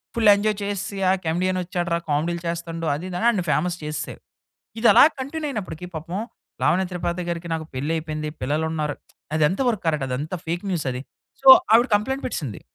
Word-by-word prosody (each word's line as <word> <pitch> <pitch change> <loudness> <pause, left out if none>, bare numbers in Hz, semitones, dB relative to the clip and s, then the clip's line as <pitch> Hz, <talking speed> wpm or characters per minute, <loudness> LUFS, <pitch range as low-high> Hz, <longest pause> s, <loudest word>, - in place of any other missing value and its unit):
Full 225 -3 +4
enjoy 210 0 0
చేస్‌సి, 200 0 -3
ఆ - - +5
కెమెడియనొచ్చాడురా, 175 0 0
కామెడీలు 165 +4 0
చేస్తండు. 170 0 -4
అది, 160 +5 -6
ఇది 180 - -4
అని 230 - +2
ఆడ్ని 205 -6 0
ఫేమస్ 175 +3 0
చేసేసారు. 150 0 -5 0.6
ఇదిలా 230 - +7 0.2
కంటిన్యూ 300 +4 -4
అయినప్పటికి 180 - -5
పాపం. 170 +5 -4 0.4
"లావణ 185 - +3
త్రిపాతి 175 0 -2
గారికి 170 0 -4
నాకు 160 -1 -3
పెళ్లి 140 +5 -2
అయిపోయింది". 155 -1 -4
పిల్లలున్నారు, 150 +1 -1 0.4
అదెంత 155 +5 +2
వరకు 215 -5 -2
కరెక్ట్. 150 -4 +1
అది 125 - -1
అంత 155 +5 -4
ఫేక్ 170 +3 -2
న్యూసది. 135 -8 -2 0.4
సో, 270 - -1 0.3
"ఆవిడ 240 +3 +6
కంప్లెయింట్ 265 +6 -1
పెట్టేసింది". 135 - -5
170 Hz, 165 wpm, -23 LUFS, 155-200 Hz, 0.6 s, ఇదిలా